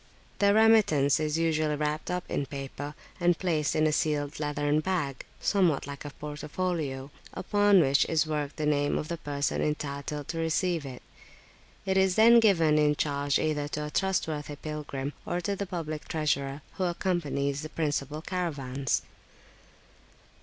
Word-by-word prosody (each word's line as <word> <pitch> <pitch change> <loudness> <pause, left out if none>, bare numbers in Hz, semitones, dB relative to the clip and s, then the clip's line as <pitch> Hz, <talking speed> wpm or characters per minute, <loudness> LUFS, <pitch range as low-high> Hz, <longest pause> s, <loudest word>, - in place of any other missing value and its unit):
The 200 -1 +5
remittance 215 -12 +5
is 155 0 0
usually 155 -2 +1
wrapped 150 +1 -2
up 180 0 -1
in 140 - -2
paper, 140 +1 -6 0.2
and 175 -1 +3
placed 160 -5 0
in 155 - +3
a 155 - +3
sealed 150 -1 -1
leathern 145 0 0
bag, 155 -6 -2
somewhat 180 -8 +2
like 140 0 -7
a - - -4
portfolio, 150 -1 -4 0.2
upon 205 -2 +4
which 140 -2 +3
is 160 -1 +1
worked 150 -2 -3
the 155 - -2
name 145 -1 +1
of 150 - -4
the 170 -1 -3
person 145 -1 -1
entitled 145 -1 -3
to 165 - -3
receive 165 -1 0
it. 125 -2 -9 0.8
It 190 0 +1
is 190 -1 +3
then 230 +2 +7
given 165 -9 +4
in 150 0 +3
charge 145 -1 0
either 150 -2 -1
to 150 0 -4
a 150 - -6
trustworthy 155 -6 -1
pilgrim, 145 -2 -5
or 175 - -2
to 200 +3 -1
the 200 0 -4
public 155 -4 -5
treasurer, 140 -2 -1
who 185 - 0
accompanies 150 -6 -1
the 155 - -6
principal 150 -1 -2
caravans. 140 -8 -2
150 Hz, 155 wpm, -28 LUFS, 145-175 Hz, 0.8 s, then